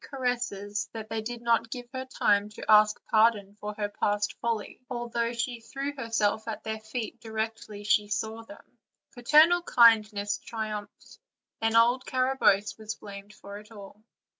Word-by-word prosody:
caresses 240 -6 -3
that 220 -1 -7
they 225 0 -2
did 240 +1 -6
not 230 -1 +2
give 245 +1 -7
her 260 0 -4
time 205 -5 +1
to 210 - -9
ask 215 0 +6
pardon 215 -3 +3
for 210 0 -5
her 205 -1 -2
past 205 0 -1
folly, 230 -3 -3
although 235 -1 -2
she 235 0 -3
threw 275 +5 -5
herself 225 -4 -1
at 220 - -5
their 220 0 -4
feet 220 +1 -6
directly 220 -2 -5
she 210 0 +2
saw 220 +2 -3
them; 300 - -13 0.5
paternal 305 +8 +5
kindness 215 -7 +4
triumphed, 215 -2 -7 0.4
and 225 0 +1
old 240 +3 +4
Carabosse 255 -6 +1
was 220 0 -5
blamed 200 0 -11
for 200 -1 -10
it 210 +2 -17
all. 205 0 -12
220 Hz, 155 wpm, -28 LUFS, 210-240 Hz, 0.5 s, ask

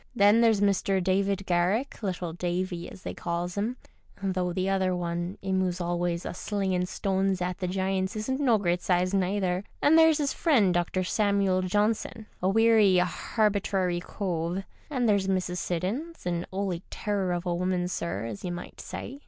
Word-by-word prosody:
Then 205 +1 +5
there's 225 -3 +4
Mr. 195 -1 +2
David 195 +1 +1
Garrick, 185 +11 0
little 180 -4 -3
Davy, 175 0 -3
as 185 - -13
they - - -4
calls 175 +1 -3
'im 220 +5 -2 0.5
(though 185 -2 0
the 185 +2 -1
other 190 -1 +1
one, 175 +1 -3
'im 190 -1 +1
who's 180 -1 -1
always 175 0 -1
a - - -4
slingin' 190 -2 -1
stones 190 0 0
at 180 +1 -3
the 185 - -2
giants, 190 +1 -1
isn't 260 +6 -2
no 250 -6 +4
great 175 -3 0
size, 180 +1 +1
neither), 190 -1 0 0.2
and 320 +3 +5
there's 320 -1 +5
'is 285 -2 0
friend 230 - +3
Dr. 175 +2 0
Samuel 200 -1 +2
Johnson, 210 +4 0 0.2
a 185 - +2
werry 220 -2 +5
harbitrary 190 0 +1
cove, 175 -1 -3 0.3
and 255 -5 0
there's 200 -2 +2
Mrs. 185 -2 0
Siddons, 205 - -3
an 175 -1 -2
"oly 190 -3 -2
terror 200 -3 -1
of 175 0 -2
a 175 - 0
woman, 180 0 0
sir, 170 -8 -3
as 110 -3 -6
you 180 - -3
might 175 - -7
say. 275 +3 -7
190 Hz, 170 wpm, -27 LUFS, 180-205 Hz, 0.5 s, Then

